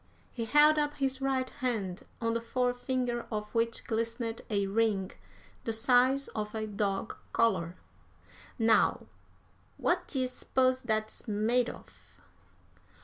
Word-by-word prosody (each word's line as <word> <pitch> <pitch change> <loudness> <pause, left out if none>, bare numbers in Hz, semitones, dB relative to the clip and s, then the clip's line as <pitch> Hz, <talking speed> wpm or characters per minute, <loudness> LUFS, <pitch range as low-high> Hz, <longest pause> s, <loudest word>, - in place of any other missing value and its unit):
He 230 -2 -4
held 300 +5 +6
up 295 0 0
his 270 -2 -1
right 265 -1 +1
hand, 225 -10 -3
on 230 -1 0
the 230 - -1
forefinger 245 0 -1
of 210 -1 -4
which 230 0 0
glistened 230 0 -2
a 200 -2 +1
ring 200 -2 +1 0.5
the 225 - -1
size 250 +4 +4
of 210 0 -4
a 215 0 -2
dog 205 0 -2 0.2
collar. 185 -7 +2 0.8
"Now, 225 -2 +3 0.7
what - - 0
d'ye 265 -3 0
s'pose 255 0 +1
that's 220 -1 -2
made 225 +4 +2
of?" - - -14
230 Hz, 125 wpm, -30 LUFS, 215-255 Hz, 0.8 s, held